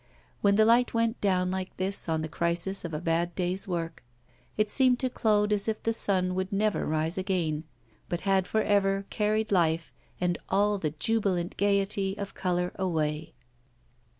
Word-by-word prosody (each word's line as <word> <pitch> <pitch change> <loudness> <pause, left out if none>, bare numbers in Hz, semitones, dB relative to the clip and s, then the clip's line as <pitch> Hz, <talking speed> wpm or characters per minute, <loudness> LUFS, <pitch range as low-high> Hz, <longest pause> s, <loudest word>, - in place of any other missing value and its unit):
When 200 -1 +4
the 215 +1 +5
light 235 +1 +3
went 230 0 0
down 185 -2 +1
like 190 0 -4
this 190 -1 -2
on 160 -1 0
the - - -2
crisis 170 +4 -1
of 170 - -5
a 150 - -3
bad 170 +1 0
day's 185 +1 -1
work, 165 -5 -4 0.5
it 215 0 +2
seemed 255 +3 +3
to 255 0 -1
Claude 210 -2 +2
as 205 0 0
if 220 -1 -2
the 225 - +1
sun 185 -4 +2
would 185 +2 -2
never 210 +1 0
rise 160 +3 0
again, 170 -5 -1 0.4
but 175 - -2
had 190 -2 +1
for 220 0 +1
ever 195 -1 +1
carried 215 +1 0
life 165 -3 +1 0.3
and 175 -1 0
all 205 0 +2
the 155 - -1
jubilant 180 +1 -1
gaiety 200 0 +1
of 200 -1 -5
colour 180 -1 -1
away. 155 -4 -2
190 Hz, 175 wpm, -28 LUFS, 175-210 Hz, 0.5 s, the